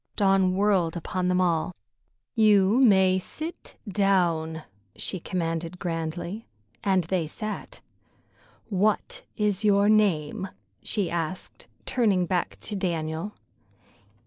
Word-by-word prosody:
Dawn 195 Hz, -2 st, +3 dB
whirled 190 Hz, -4 st, +2 dB
upon 180 Hz, +2 st, -2 dB
them 180 Hz, 0 st, +2 dB
all. 175 Hz, -1 st, +1 dB, 0.6 s
"You 210 Hz, 0 st, +4 dB
may 190 Hz, -6 st, +5 dB
sit 325 Hz, -, -7 dB
down," 175 Hz, -5 st, +1 dB, 0.3 s
she 185 Hz, -, -2 dB
commanded 165 Hz, 0 st, -3 dB
grandly, 175 Hz, +4 st, -4 dB, 0.4 s
and 190 Hz, -3 st, +2 dB
they 170 Hz, -1 st, -1 dB
sat. 215 Hz, +6 st, -6 dB, 0.9 s
"What 205 Hz, +1 st, 0 dB, 0.2 s
is 210 Hz, -1 st, 0 dB
your 205 Hz, 0 st, +4 dB
name?" 190 Hz, -5 st, +2 dB, 0.3 s
she 205 Hz, -5 st, -1 dB
asked, 170 Hz, +1 st, -4 dB, 0.2 s
turning 205 Hz, -8 st, +2 dB
back 180 Hz, 0 st, -1 dB
to 210 Hz, -, -5 dB
Daniel. 165 Hz, +1 st, -2 dB
185 Hz, 105 wpm, -26 LUFS, 170-205 Hz, 0.9 s, may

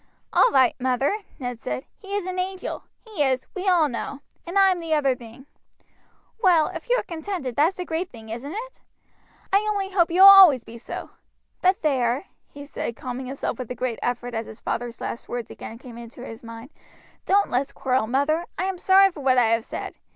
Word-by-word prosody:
"All -, -, +6 dB
right, 260 Hz, -2 st, +4 dB
mother," 260 Hz, -, 0 dB, 0.2 s
Ned 245 Hz, -3 st, -5 dB
said. 125 Hz, -, -4 dB
"He 400 Hz, 0 st, -6 dB
is 410 Hz, -3 st, -2 dB
an 370 Hz, 0 st, -3 dB
angel, 375 Hz, 0 st, -4 dB, 0.2 s
he 430 Hz, -9 st, -6 dB
is, 260 Hz, -2 st, +1 dB
we 385 Hz, 0 st, -4 dB
all 345 Hz, -4 st, +4 dB
know, 275 Hz, +2 st, -5 dB, 0.3 s
and 350 Hz, +3 st, -2 dB
I 390 Hz, -1 st, +6 dB
am 360 Hz, -, -1 dB
the 325 Hz, -2 st, 0 dB
other 275 Hz, -4 st, +2 dB
thing. 240 Hz, +2 st, -13 dB, 1.0 s
Well, 350 Hz, -6 st, +4 dB
if 335 Hz, +4 st, -8 dB
you -, -, +4 dB
are -, -, -1 dB
contented, 330 Hz, -, -5 dB
that's 320 Hz, +6 st, +3 dB
the 360 Hz, -, -4 dB
great 335 Hz, +2 st, -3 dB
thing, 220 Hz, -2 st, -13 dB
isn't 240 Hz, +6 st, -6 dB
it? -, -, -7 dB, 0.7 s
I 395 Hz, -, +7 dB
only 395 Hz, -2 st, -2 dB
hope 345 Hz, -3 st, +3 dB
you 350 Hz, +3 st, +2 dB
will -, -, +12 dB
always 375 Hz, -11 st, +9 dB
be 230 Hz, +1 st, -11 dB
so; -, -, -7 dB, 0.5 s
but 370 Hz, 0 st, +2 dB
there," 260 Hz, 0 st, +1 dB, 0.2 s
he 285 Hz, 0 st, -10 dB
said, 255 Hz, -4 st, -5 dB
calming 255 Hz, 0 st, -6 dB
himself 265 Hz, -2 st, -4 dB
with 255 Hz, -, -5 dB
a 250 Hz, -, -4 dB
great 250 Hz, -3 st, -3 dB
effort 245 Hz, 0 st, -2 dB
as 225 Hz, 0 st, -3 dB
his 220 Hz, -, -11 dB
father's 240 Hz, 0 st, -4 dB
last 235 Hz, -, -5 dB
words 240 Hz, -2 st, -5 dB
again 225 Hz, -, -9 dB
came 240 Hz, -1 st, -11 dB
into 235 Hz, +1 st, -10 dB
his 225 Hz, +1 st, -9 dB
mind, 230 Hz, +2 st, -10 dB, 0.6 s
"don't 400 Hz, +1 st, +3 dB
let's 265 Hz, +3 st, 0 dB
quarrel, 255 Hz, -4 st, 0 dB
mother. 285 Hz, +7 st, +1 dB
I 355 Hz, -, -1 dB
am 380 Hz, -1 st, -2 dB
sorry 385 Hz, +1 st, +5 dB
for 335 Hz, -, -11 dB
what 260 Hz, -2 st, +2 dB
I 235 Hz, -3 st, +4 dB
have 230 Hz, 0 st, +2 dB
said. -, -, -6 dB
280 Hz, 210 wpm, -24 LUFS, 245-370 Hz, 1.0 s, will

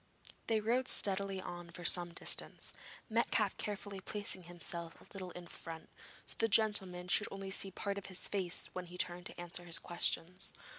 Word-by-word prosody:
They 225 Hz, -1 st, +3 dB
rode 240 Hz, +4 st, +1 dB
steadily 195 Hz, -1 st, +1 dB
on 175 Hz, -2 st, -7 dB
for 175 Hz, +1 st, -9 dB
some 175 Hz, 0 st, +6 dB
distance, 170 Hz, -, -1 dB, 0.3 s
Metcalfe 220 Hz, -3 st, +2 dB
carefully 205 Hz, -1 st, -4 dB
placing 205 Hz, -3 st, -4 dB
himself 170 Hz, -1 st, -6 dB
a -, -, -16 dB
little 190 Hz, -2 st, -5 dB
in 180 Hz, 0 st, -8 dB
front, 165 Hz, -1 st, -7 dB, 0.4 s
so -, -, 0 dB
that -, -, -19 dB
the 225 Hz, -, +4 dB
gentleman 195 Hz, -5 st, +5 dB
should 205 Hz, +3 st, +5 dB
only 195 Hz, -1 st, -5 dB
see 195 Hz, 0 st, +5 dB
part 200 Hz, +1 st, -3 dB
of 200 Hz, -, -9 dB
his 185 Hz, -1 st, -3 dB
face 185 Hz, -4 st, -1 dB
when 180 Hz, -1 st, -5 dB
he 180 Hz, +1 st, -9 dB
turned 175 Hz, 0 st, -1 dB
to -, -, -10 dB
answer 175 Hz, 0 st, -4 dB
his 165 Hz, -2 st, +4 dB
questions. 175 Hz, +4 st, 0 dB
185 Hz, 185 wpm, -36 LUFS, 175-200 Hz, 0.4 s, some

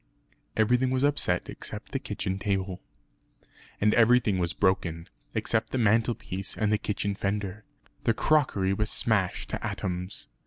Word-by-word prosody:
Everything 125 Hz, +4 st, +3 dB
was 130 Hz, +1 st, +1 dB
upset 145 Hz, -12 st, +1 dB
except -, -, -8 dB
the -, -, -1 dB
kitchen 95 Hz, -1 st, -3 dB
table. 95 Hz, -2 st, -2 dB, 1.0 s
And 105 Hz, +1 st, +3 dB
everything 115 Hz, -4 st, +4 dB
was 85 Hz, -1 st, +1 dB
broken, 85 Hz, -4 st, 0 dB, 0.3 s
except 110 Hz, -1 st, 0 dB
the -, -, -1 dB
mantelpiece 110 Hz, -4 st, 0 dB
and 105 Hz, -1 st, +1 dB
the 105 Hz, -, +2 dB
kitchen 105 Hz, -1 st, -1 dB
fender. 100 Hz, +1 st, -3 dB, 0.4 s
The 115 Hz, -, +3 dB
crockery 110 Hz, -12 st, +2 dB
was 105 Hz, +2 st, 0 dB
smashed 100 Hz, -6 st, +1 dB
to -, -, -3 dB
atoms. 90 Hz, 0 st, -4 dB
105 Hz, 140 wpm, -28 LUFS, 95-115 Hz, 1.0 s, everything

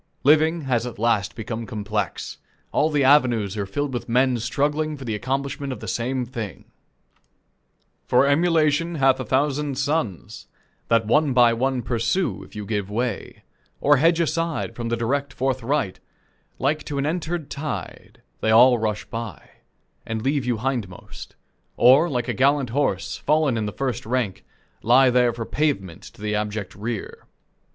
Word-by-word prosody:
Living 155 Hz, +3 st, +4 dB
has 125 Hz, -4 st, 0 dB
at 120 Hz, -, -8 dB
last 110 Hz, -2 st, 0 dB
become 115 Hz, 0 st, -5 dB
complex. 105 Hz, -3 st, -4 dB, 0.3 s
All 155 Hz, -, +2 dB
the 145 Hz, -3 st, +1 dB
avenues 120 Hz, -8 st, +3 dB
are 100 Hz, -2 st, -3 dB
filled 145 Hz, +7 st, -3 dB
with 120 Hz, -, -4 dB
men 125 Hz, +1 st, +2 dB
struggling 150 Hz, +5 st, -1 dB
for 135 Hz, -, -9 dB
the 110 Hz, -, -2 dB
accomplishment 135 Hz, +4 st, -3 dB
of 125 Hz, -, -5 dB
the 110 Hz, -, -8 dB
same 125 Hz, +6 st, -1 dB
thing: 115 Hz, -6 st, -7 dB, 1.4 s
"For 125 Hz, +2 st, +4 dB
emulation 160 Hz, +2 st, +2 dB
hath 135 Hz, -3 st, +3 dB
a -, -, -2 dB
thousand 140 Hz, +2 st, 0 dB
sons 135 Hz, -, -2 dB, 0.4 s
That 115 Hz, -1 st, +3 dB
one 145 Hz, +5 st, +2 dB
by 120 Hz, -2 st, +5 dB
one 130 Hz, +1 st, -1 dB
pursue: 120 Hz, -, -1 dB
if -, -, -16 dB
you 105 Hz, -1 st, -5 dB
give 100 Hz, -2 st, -2 dB
way, 115 Hz, 0 st, -3 dB, 0.4 s
Or 145 Hz, 0 st, +4 dB
hedge 165 Hz, +4 st, +3 dB
aside 165 Hz, 0 st, -1 dB
from 120 Hz, -1 st, -4 dB
the 115 Hz, -, 0 dB
direct 140 Hz, +5 st, -1 dB
forthright, 130 Hz, -3 st, -1 dB, 0.6 s
Like 150 Hz, +4 st, 0 dB
to 145 Hz, -, -4 dB
an 140 Hz, -, 0 dB
entered 160 Hz, -1 st, -3 dB
tide, 140 Hz, -, -6 dB, 0.2 s
they 110 Hz, -, 0 dB
all 120 Hz, +2 st, +6 dB
rush 105 Hz, -1 st, -2 dB
by, 115 Hz, -2 st, -7 dB, 0.5 s
And 110 Hz, -1 st, -4 dB
leave 135 Hz, -2 st, 0 dB
you 120 Hz, -2 st, +1 dB
hindmost; 115 Hz, -7 st, -5 dB, 0.4 s
Or, 135 Hz, +8 st, +6 dB
like 125 Hz, -4 st, -2 dB
a -, -, -1 dB
gallant 135 Hz, -2 st, +2 dB
horse, 120 Hz, -8 st, -1 dB
fallen 150 Hz, -3 st, +1 dB
in 105 Hz, -2 st, -2 dB
first 130 Hz, 0 st, -3 dB
rank, 120 Hz, -6 st, -1 dB, 0.4 s
Lie 125 Hz, +3 st, +5 dB
there 125 Hz, -1 st, +3 dB
for 115 Hz, -1 st, -5 dB
pavement 100 Hz, -, -1 dB
to 105 Hz, -, -13 dB
the 105 Hz, 0 st, -1 dB
abject 105 Hz, -2 st, -3 dB
rear." 110 Hz, +1 st, -6 dB
125 Hz, 160 wpm, -23 LUFS, 110-145 Hz, 1.4 s, all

